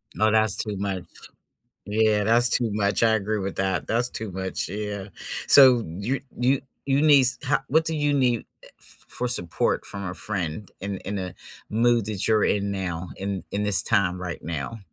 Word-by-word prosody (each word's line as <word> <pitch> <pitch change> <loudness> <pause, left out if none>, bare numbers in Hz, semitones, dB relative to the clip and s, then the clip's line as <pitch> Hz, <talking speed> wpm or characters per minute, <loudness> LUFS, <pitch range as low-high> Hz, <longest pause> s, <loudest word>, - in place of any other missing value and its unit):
No, 110 0 +2
that's 110 -2 +2
too 105 -3 -3
much 95 -2 -3 0.8
yeah, 105 0 +2
that's 120 +3 +5
too 120 -4 +2
much, 105 +2 +1
I 115 - +4
agree 110 0 -1
with 100 -1 -5
that. 95 -2 -1
That's 120 +2 +1
too 110 -3 -3
much, 95 0 -3
yeah, 105 0 -5 0.4
so, 130 -4 +7
you 100 +11 -3 0.2
you 130 +2 +2 0.3
you 135 +1 +2
needs 140 -4 +6
ho 145 - +2
what 160 +3 +2
do 160 - 0
you 145 -1 0
need, 125 -4 +2 0.2
eh, - - -13
f - - -11
for 125 - -3
support 90 -8 0
from 100 -1 -4
a - - -5
friend 95 -2 -3
in 100 0 -4
in 100 0 -3
a 90 -2 -5 0.4
mood 115 0 +2
that 105 -1 0
you're 110 -1 +3
in 100 0 0
now, 90 -3 -4
in 95 -1 -4
in 100 - -2
this 105 -1 +4
time 100 -4 +1
right 85 -2 -6
now? 80 +7 -5
105 Hz, 190 wpm, -24 LUFS, 95-120 Hz, 0.8 s, so